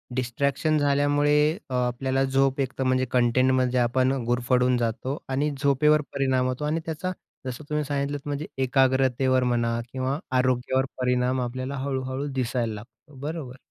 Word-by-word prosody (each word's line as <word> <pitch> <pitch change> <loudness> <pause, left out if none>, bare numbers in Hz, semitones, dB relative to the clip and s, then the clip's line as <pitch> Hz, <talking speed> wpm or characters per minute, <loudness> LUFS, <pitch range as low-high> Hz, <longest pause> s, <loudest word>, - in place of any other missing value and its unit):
Distraction 140 +5 0
झाल्यामुळे 145 +1 +3 0.3
अ, 130 - -5
आपल्याला 130 +2 0
झोप 135 0 +1
एक 135 0 -2
तर 135 - 0
म्हणजे 130 0 +2
कंटेंटमध्ये 130 +1 +2
आपण 130 +2 +2
अ, 135 - -1
गुरफडून 125 +1 +2
जातो. 120 +4 -2
आणि 145 +3 0
झोपेवर 150 +2 +4
परिणाम 130 -2 +1
होतो. 130 +4 -2
आणि 155 +2 0
त्याचा 165 +3 -3 0.3
जसं 130 +3 -5
तुम्ही 150 0 0
सांगितलंत, 145 0 -2
म्हणजे 145 +1 -3 0.2
एकाग्रतेवर 130 0 +2
म्हणा 120 -1 0
किंवा 130 +2 -2 0.2
आरोग्यावर 130 +1 +1 0.2
परिणाम 125 +1 +1
आपल्याला 130 +3 -4
हळू-हळू 130 0 -3
दिसायला 120 -3 -1
लागतो. 130 +7 -13
बरोबर. 145 -3 -5
130 Hz, 145 wpm, -25 LUFS, 125-140 Hz, 0.3 s, झोपेवर